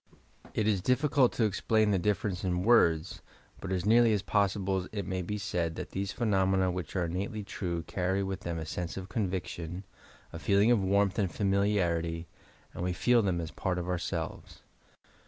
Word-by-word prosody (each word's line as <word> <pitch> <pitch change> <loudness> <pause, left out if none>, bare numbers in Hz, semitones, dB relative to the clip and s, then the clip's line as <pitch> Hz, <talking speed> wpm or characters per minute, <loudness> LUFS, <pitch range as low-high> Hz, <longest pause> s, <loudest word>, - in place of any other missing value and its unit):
It 110 - +1
is 100 -4 +2
difficult 130 +2 +3
to 120 - 0
explain 110 +1 +2
the 95 - +2
difference 100 -1 -1
in 90 -1 0
words, 90 -7 +3 0.4
but 95 - -6
as 90 -1 -1
nearly 115 +1 +5
as 100 -2 0
poa 100 +1 +3
sible 95 -1 -2
it 100 -3 -3
may 95 +1 -2
be 105 +4 -3
said 90 -6 -2
that - - -6
those 100 +1 -3
phenomena 95 -4 +2
which 90 -1 -5
are 90 -2 +1
innately 100 +5 -3
true 90 -4 -4
carry 95 +5 -1
with 95 0 -3
them 85 -1 -4
a 80 - -4
sense 85 +3 -4
of 95 0 -6
conviction, 90 -4 -3 0.5
a 85 - -6
feeling 100 +5 +3
of 110 -5 +3
warmth 100 +1 +2
and 95 -4 +1
familiarity, 90 -4 0 0.5
and - - -5
we 90 0 0
feel 120 +6 +3
them 95 -4 0
as 80 -1 -5
part 90 -1 -2
of 90 0 -3
ourselves. 90 -2 -4
95 Hz, 185 wpm, -30 LUFS, 90-105 Hz, 0.5 s, nearly